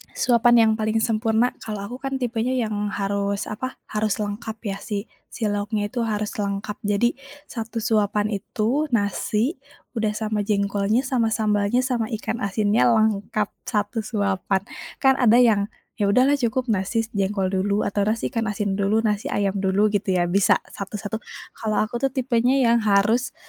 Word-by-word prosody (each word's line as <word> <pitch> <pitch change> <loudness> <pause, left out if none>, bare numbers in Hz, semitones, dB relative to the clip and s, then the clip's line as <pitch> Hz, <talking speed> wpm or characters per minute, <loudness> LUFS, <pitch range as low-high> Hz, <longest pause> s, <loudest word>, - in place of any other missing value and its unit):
Suapan 240 -1 +4
yang 220 - +4
paling 220 +1 +1
sempurna 225 +1 +2 0.2
kalau 215 -2 -4
aku 245 - -7
kan 270 0 -2
tipenya 240 0 -1
yang 215 -1 -3 0.2
harus 200 0 -1
apa, 240 +5 -3 0.3
harus 215 -1 +1
lengkap 215 +2 -5 0.2
ya 195 - -4
si 205 -2 -1 0.4
si - - -10
lauknya 205 +1 -1
itu 250 - -3
harus 210 0 -2
lengkap. 200 +1 -2 0.2
Jadi, 235 +4 +3 0.4
satu 230 -1 -5
suapan 210 -1 +1
itu 230 +9 -1
nasi, 215 - 0 0.4
udah 220 -2 +1
sama 215 0 -2
jengkolnya, 200 +3 +1
sama 255 -4 +1
sambalnya, 210 +1 +1
sama 245 -4 -1
ikan 220 +1 -4
asinnya, 210 +3 +2
lengkap 215 -1 +1 0.2
satu 210 +2 -1
suapan. 200 -3 0 0.4
Kan 265 0 +5
ada 235 -3 +5
yang, 225 -5 +4 0.3
ya 205 - +2
udahlah 260 +7 +4
cukup 245 0 0
nasi 210 +3 0
jengkol 195 -1 0
dulu, 200 +2 +1
atau 200 0 0
nasi 220 +1 -1
ikan 225 -1 -1
asin 200 -1 -2
dulu 210 +3 +2
nasi 210 -1 0
ayam 200 -1 0
dulu 200 +2 +2
gitu 200 -2 0
ya 175 - +3
bisa 195 -1 +4 0.2
satu-satu. 205 +2 -5 0.4
Kalau 215 -1 -1
aku 235 +2 -4
tuh 270 - +2
tipenya 250 -1 +2
yang 235 0 +4
harus, 215 +4 +2
215 Hz, 160 wpm, -23 LUFS, 200-230 Hz, 0.4 s, Kan